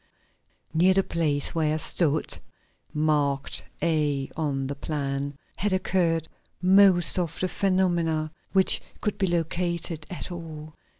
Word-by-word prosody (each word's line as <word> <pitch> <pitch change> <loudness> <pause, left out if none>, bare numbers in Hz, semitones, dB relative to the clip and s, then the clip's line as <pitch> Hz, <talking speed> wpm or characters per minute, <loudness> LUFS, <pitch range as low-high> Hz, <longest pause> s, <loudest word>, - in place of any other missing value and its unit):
] - - -42
Near 185 +1 +5
the 195 - +4
place 150 -5 +2
where 155 -2 +1
I - - -1
stood 155 -1 +1 0.5
(marked 145 -2 0 0.2
A 150 -4 0
on 140 -4 -2
the 140 - -3
plan), 140 -1 -3 0.2
had 205 0 0
occurred 170 -3 +1 0.3
most 185 -2 +5
of 170 -3 -3
the 185 - 0
phenomena, 175 -5 0 0.2
which 190 -1 +4 0.2
could 210 -1 -2
be 190 - +2
located 170 -1 -1
at 180 0 -2
all. 155 -3 -8
165 Hz, 130 wpm, -26 LUFS, 150-180 Hz, 0.5 s, Near